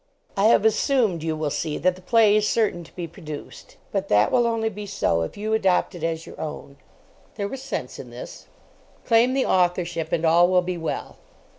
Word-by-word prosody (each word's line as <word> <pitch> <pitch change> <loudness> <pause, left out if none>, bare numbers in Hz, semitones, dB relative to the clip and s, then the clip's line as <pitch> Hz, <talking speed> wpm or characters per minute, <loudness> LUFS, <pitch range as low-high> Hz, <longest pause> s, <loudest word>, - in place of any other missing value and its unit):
"I 200 - +2
have 220 -1 +5
assumed, 220 - +2
you 160 0 -2
will 155 -2 -2
see, 155 0 -2
that 185 0 +1
the 185 - -14
play 215 +2 +4
is 215 0 +2
certain 205 -6 0
to - - -19
be 175 - -4
produced. 155 -3 -10
But - - -2
that 105 +1 +3
will 240 -2 +3
only 225 -1 0
be 210 -1 -8
so 85 - 0
if 80 - -5
you 215 +1 -2
adopt 195 -3 +2
it 175 -3 -9
as 165 0 -2
your - - -10
own," 150 -2 -7 0.6
(There 200 -2 -2
was 265 +5 -7
sense 270 - -5
in - - -9
this.) - - -10 0.6
"Claim 240 +2 +4
the 270 - +2
authorship, 175 -3 0
and 165 - 0
all 170 +2 +5
will 180 0 +3
be 180 0 -3
well." 165 - -4
185 Hz, 205 wpm, -24 LUFS, 165-220 Hz, 0.6 s, have